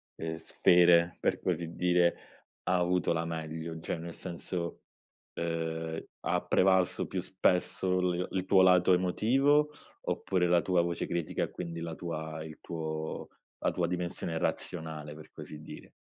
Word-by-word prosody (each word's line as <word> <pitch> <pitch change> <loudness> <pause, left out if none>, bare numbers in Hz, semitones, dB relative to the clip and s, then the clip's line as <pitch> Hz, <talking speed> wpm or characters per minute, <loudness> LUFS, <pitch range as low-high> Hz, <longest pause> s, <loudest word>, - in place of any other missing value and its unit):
ehm, 80 0 -4
sfere 85 +1 +4
per - - 0
così 85 -2 -2
dire, 90 -1 +3 0.5
ha 90 - +2
avuto 90 0 +1
la 85 0 0
meglio? 80 0 -4
Cioè - - -3
nel 85 +1 -7
senso, 85 -1 -4 0.5
ehm, 80 -1 -3 0.2
ha - - 0
prevalso 95 -1 +3
più 95 - -3
spesso 90 0 +1
l 90 0 0
il 95 -1 -1
tuo 95 -1 +5
lato 90 0 +6
emotivo, 135 +12 +3 0.3
oppure 90 -2 0
la 85 0 +4
tua 90 +1 +2
voce 85 0 -1
critica, 85 -2 -2
e - - -3
quindi 85 -2 -5
la 85 -1 -4
tua 80 -2 -5
il 80 -1 -10
tuo 80 -1 -4 0.3
la - - +1
tua 85 -2 0
dimensione 85 -2 -3
razionale 80 -2 -3
per 80 0 -13
così 75 -1 -9
dire? 75 - -11
85 Hz, 150 wpm, -31 LUFS, 80-90 Hz, 0.5 s, lato